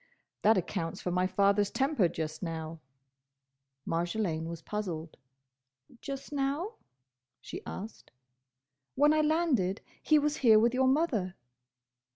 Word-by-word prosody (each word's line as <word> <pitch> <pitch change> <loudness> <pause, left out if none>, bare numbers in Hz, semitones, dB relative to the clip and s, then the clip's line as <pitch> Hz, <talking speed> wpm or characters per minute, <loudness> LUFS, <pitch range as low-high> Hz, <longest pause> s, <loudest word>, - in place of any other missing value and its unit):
"That 215 0 +5
accounts 170 -2 -2
for 180 - -3
my 180 +1 +2
father's 200 +2 +3
temper 270 - +2
just 155 -1 -5
now." 165 -2 -5 1.1
Marjolaine 170 -1 -1
was 165 -1 -7
puzzled. 170 -7 -4 0.9
"Just 275 +1 -6
now?" 290 +10 -1 0.6
she - - -8
asked. 215 +4 -8 0.9
"When 295 +3 +5
I 310 - +3
landed, 300 - +1 0.2
he 310 - +4
was 300 0 +1
here 225 -4 +6
with 235 +3 +4
your 260 +1 +3
mother." 255 - +1
210 Hz, 120 wpm, -30 LUFS, 175-275 Hz, 1.1 s, here